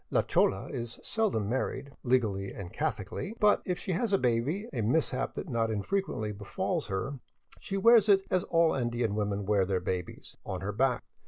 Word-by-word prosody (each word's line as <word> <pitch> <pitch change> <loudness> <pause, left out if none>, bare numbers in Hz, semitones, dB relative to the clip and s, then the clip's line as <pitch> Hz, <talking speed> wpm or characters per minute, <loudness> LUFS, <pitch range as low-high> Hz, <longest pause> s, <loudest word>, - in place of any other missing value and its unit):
La - - +2
chola 95 +1 +2
is 120 -4 -5
seldom 205 - 0
married 130 +3 -2
* - - -45
legally 100 -6 +1
and 95 0 -8
Catholicly," 115 - -3
but 210 -1 +4
if 180 -1 -1
she - - -4
has 200 +5 0
a 195 - +5
baby, 130 - 0
a 120 - -1
mishap 130 +3 0
that - - -5
not 115 -5 0
infrequently 110 - -1
befalls 155 - -3
her, 105 +8 -3 0.4
she 195 - -4
wears 225 +1 +6
it 195 -1 +6
as 185 -1 +2
all 165 -1 +3
Andean 120 -4 -1
women 105 -1 -1
wear 100 -1 +3
their 95 0 0
babies, 90 0 -5
— - - -43
on 90 - -4
her 100 +2 -2
back. 125 +4 +1
120 Hz, 190 wpm, -30 LUFS, -, 0.4 s, wears